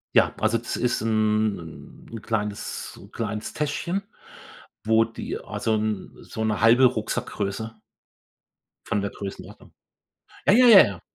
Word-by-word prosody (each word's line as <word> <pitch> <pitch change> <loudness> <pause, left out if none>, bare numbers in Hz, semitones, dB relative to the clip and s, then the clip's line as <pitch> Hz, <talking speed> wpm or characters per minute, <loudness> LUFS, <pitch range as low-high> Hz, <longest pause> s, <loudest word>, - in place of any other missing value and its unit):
Ja, - - +4
also 110 +1 +2
das 120 - -5
ist 125 -3 0
'n 110 -6 -1
'n 115 -2 -7
kleines 105 -2 -3
so - - -14
'n - - -16
kleines 110 -1 -4
Täschchen, 160 +6 -2 0.8
wo 110 +1 +4
die 115 - -6
also 110 - -2
'n 105 -2 -2
so 110 - -5
'ne 105 -2 0
1/2 115 +4 +6
Rucksackgröße 110 -2 -2 1.1
von 105 - -1
der 100 - -3
Größenordnung. 100 -1 -9 0.7
Ja, - - +6
ja, 250 +4 +6
ja, 205 -5 +10
ja. 95 -4 -6
110 Hz, 140 wpm, -24 LUFS, 105-115 Hz, 1.1 s, ja